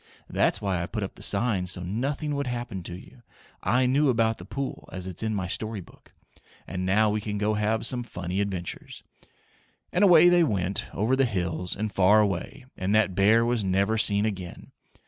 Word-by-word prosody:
That's -, -, +1 dB
why 95 Hz, -4 st, -1 dB
I 85 Hz, -, -3 dB
put 110 Hz, -1 st, -4 dB
up 95 Hz, -, -5 dB
the -, -, -15 dB
sign 100 Hz, -3 st, +1 dB
so 90 Hz, 0 st, -1 dB
nothing 140 Hz, -, -2 dB
would 140 Hz, -1 st, -2 dB
happen 120 Hz, -6 st, -4 dB
to 85 Hz, -, -6 dB
you. 105 Hz, +6 st, -14 dB, 0.4 s
I 125 Hz, +6 st, +2 dB
knew 140 Hz, +3 st, +3 dB
about 115 Hz, -2 st, +1 dB
the 90 Hz, -, -9 dB
pool, 135 Hz, +6 st, -5 dB
as 95 Hz, -1 st, -4 dB
it's 95 Hz, -2 st, -5 dB
in 110 Hz, -1 st, -1 dB
my 95 Hz, -2 st, -2 dB
story 110 Hz, +3 st, -4 dB
book. 90 Hz, -, -16 dB, 0.5 s
And 90 Hz, 0 st, -4 dB
now 105 Hz, +3 st, +3 dB
we 105 Hz, 0 st, -1 dB
can 105 Hz, -1 st, -4 dB
go 105 Hz, +1 st, 0 dB
have 105 Hz, +2 st, 0 dB
some 125 Hz, +1 st, 0 dB
funny 95 Hz, -4 st, -4 dB
adventures." 95 Hz, -4 st, -5 dB, 0.9 s
And 180 Hz, -, +3 dB
away 175 Hz, -3 st, +7 dB
they 175 Hz, -1 st, +5 dB
went 100 Hz, -, -1 dB
over 110 Hz, +6 st, +1 dB
the 135 Hz, 0 st, +3 dB
hills 90 Hz, -5 st, -2 dB
and 105 Hz, -1 st, -3 dB
far 95 Hz, +4 st, +5 dB
away 105 Hz, +7 st, -2 dB
and 95 Hz, +3 st, -1 dB
that 110 Hz, -3 st, +3 dB
bear 105 Hz, +5 st, +4 dB
was 120 Hz, -2 st, 0 dB
never 100 Hz, +3 st, +1 dB
seen 105 Hz, -1 st, +3 dB
again. 95 Hz, -5 st, -6 dB
105 Hz, 200 wpm, -26 LUFS, 95-120 Hz, 0.9 s, away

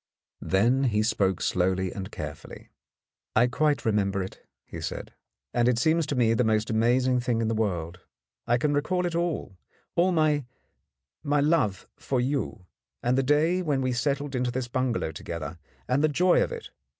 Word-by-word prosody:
Then 120 Hz, +8 st, +2 dB
he 105 Hz, -3 st, +2 dB
spoke 95 Hz, -4 st, +1 dB
slowly 95 Hz, 0 st, 0 dB
and 95 Hz, -1 st, -6 dB
carefully. -, -, -8 dB, 0.7 s
"I -, -, +6 dB
quite 145 Hz, +3 st, +1 dB
remember 100 Hz, -3 st, +1 dB
it," 95 Hz, -, -10 dB, 0.2 s
he -, -, -8 dB
said, -, -, -5 dB, 0.4 s
"and 120 Hz, 0 st, +2 dB
it 125 Hz, -2 st, +3 dB
seems 160 Hz, +5 st, +2 dB
to 145 Hz, -, -1 dB
me 115 Hz, -3 st, +3 dB
the 125 Hz, -, +2 dB
most 110 Hz, -1 st, +1 dB
amazing 125 Hz, +3 st, +2 dB
thing 120 Hz, -2 st, 0 dB
in 115 Hz, -1 st, 0 dB
the -, -, 0 dB
world. 90 Hz, -6 st, -2 dB, 0.5 s
I 120 Hz, -, +3 dB
can 145 Hz, +4 st, +1 dB
re 145 Hz, -, +2 dB
call 180 Hz, +4 st, -1 dB
it 175 Hz, -, -2 dB
all, 165 Hz, -, -2 dB, 0.4 s
all 180 Hz, +2 st, +3 dB
my— 155 Hz, -4 st, +2 dB, 0.8 s
my 145 Hz, 0 st, +1 dB
love 145 Hz, -, +1 dB
for 130 Hz, -, -1 dB
you, 130 Hz, -7 st, -2 dB, 0.4 s
and 120 Hz, +1 st, +2 dB
the 135 Hz, -, +3 dB
day 155 Hz, +7 st, +2 dB
when 150 Hz, -6 st, 0 dB
we 130 Hz, -1 st, 0 dB
settled 140 Hz, +3 st, -1 dB
into 125 Hz, -1 st, 0 dB
this 125 Hz, 0 st, -3 dB
bungalow 125 Hz, -8 st, -1 dB
together, 85 Hz, 0 st, -6 dB, 0.3 s
and 135 Hz, +4 st, +1 dB
the -, -, +6 dB
joy 175 Hz, +4 st, +3 dB
of -, -, 0 dB
it. 470 Hz, -1 st, -7 dB
125 Hz, 180 wpm, -27 LUFS, 110-145 Hz, 0.8 s, I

